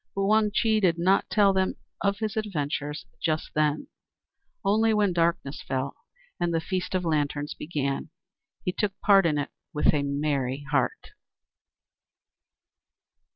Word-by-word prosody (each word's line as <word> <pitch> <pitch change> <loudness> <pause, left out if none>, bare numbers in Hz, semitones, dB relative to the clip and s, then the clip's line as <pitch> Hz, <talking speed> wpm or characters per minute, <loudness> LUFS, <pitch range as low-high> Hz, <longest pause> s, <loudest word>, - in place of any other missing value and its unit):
But 195 0 0
Wang 215 +1 +4
Chih 220 +1 +2
did 175 -5 +2
not 185 +3 +2
tell 200 -2 +4
them 190 0 +1 0.4
his 220 +1 -3
adventures 150 -8 -3 0.2
just 155 -1 -1
then; 150 0 +1 0.8
only 220 +2 +3
when 205 -3 +2
darkness 170 -4 0
fell, 135 +1 -3 0.4
and 175 0 +1
the 165 - +1
Feast 185 +3 -3
of 180 -1 0
Lanterns 145 -2 0
began, 145 -1 -3 0.6
he 180 - +1
took 200 +1 -2
part 195 -3 +6
in 150 -2 +1
it 145 - -2 0.2
with 150 - +4
a 145 - +2
merry 140 -1 -1
heart. 135 -3 0
170 Hz, 135 wpm, -27 LUFS, 145-195 Hz, 0.8 s, part